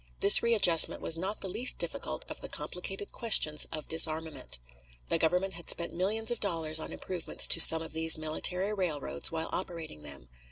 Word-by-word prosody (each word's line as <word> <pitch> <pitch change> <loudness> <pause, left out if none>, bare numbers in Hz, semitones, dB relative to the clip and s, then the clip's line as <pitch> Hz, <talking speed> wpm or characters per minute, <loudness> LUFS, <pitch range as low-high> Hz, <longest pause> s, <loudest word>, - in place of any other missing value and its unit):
This 200 - +8
readjustment 205 -8 +4
was 165 - +2
not 190 +5 -6
the - - -4
least 245 +7 +1
difficult - - -6
of - - -8
the - - -9
complicated 195 +3 -5
questions 155 -10 +1
of 155 -2 -8
disarmament. 160 - -2 0.5
The - - 0
Government 180 +4 -1
had 170 0 -9
spent 170 - -3
millions 215 +6 -3
of 240 - -4
dollars 165 -5 -3
on - - -6
improvements 180 -3 -4
to 165 - +6
some 160 0 +8
of 160 - -10
these 160 0 +4
military 180 +6 -2
railroads 150 - -3
while 160 0 -4
operating 165 - -6
them. 70 -4 -11
165 Hz, 175 wpm, -28 LUFS, 160-190 Hz, 0.5 s, This